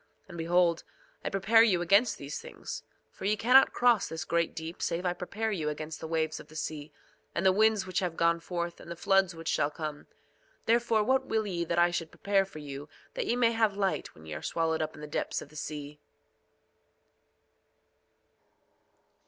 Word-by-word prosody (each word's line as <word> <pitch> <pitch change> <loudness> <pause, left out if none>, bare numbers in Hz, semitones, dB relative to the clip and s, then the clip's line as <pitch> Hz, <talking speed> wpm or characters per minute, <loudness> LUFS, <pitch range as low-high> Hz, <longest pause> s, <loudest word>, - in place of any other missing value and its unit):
2:25 - - -35
And 170 - -9
behold, 170 0 +2 0.4
I - - +1
prepare 205 +4 +4
you 205 -6 +4
against 205 +5 +4
these 140 +1 -6
things; - - -7 0.3
for - - -9
ye 210 +2 +2
cannot 250 +5 +6
cross 240 -4 +3
this 160 -1 -5
great 170 -1 0
deep 160 +1 -6
save 170 +2 -1
I 175 - +2
prepare 210 +5 -3
you 160 -7 -1
against 155 0 -5
the - - -6
waves 160 -1 -1
of - - -12
the 155 - -15
sea, 150 -1 -5 0.4
and 170 - -1
the 190 - +7
winds 215 +1 +3
which 185 -1 -1
have 175 -3 -3
gone 170 0 +3
forth, 170 0 -4
and - - -12
the 170 - -5
floods 190 0 +2
which 165 0 -9
shall 145 - +2
come. 150 -1 -6 0.6
Therefore 230 -1 +3
what 260 +3 +2
will 220 -1 0
ye 175 -4 -2
that 170 +1 -2
I 175 0 +5
should 165 -2 -2
prepare 200 -1 +1
for 190 - -12
you 145 0 -7 0.2
that - - -3
ye - - +2
may 240 -2 +3
have 220 -3 +1
light 195 -2 -1
when 80 - -15
ye 80 - -6
are 75 - -5
swallowed 160 -1 0
up 155 0 -3
in - - -11
the - - -5
depths 150 - -2
of - - -10
the 155 - -18
sea? 150 -1 -6
175 Hz, 200 wpm, -30 LUFS, 160-205 Hz, 0.6 s, the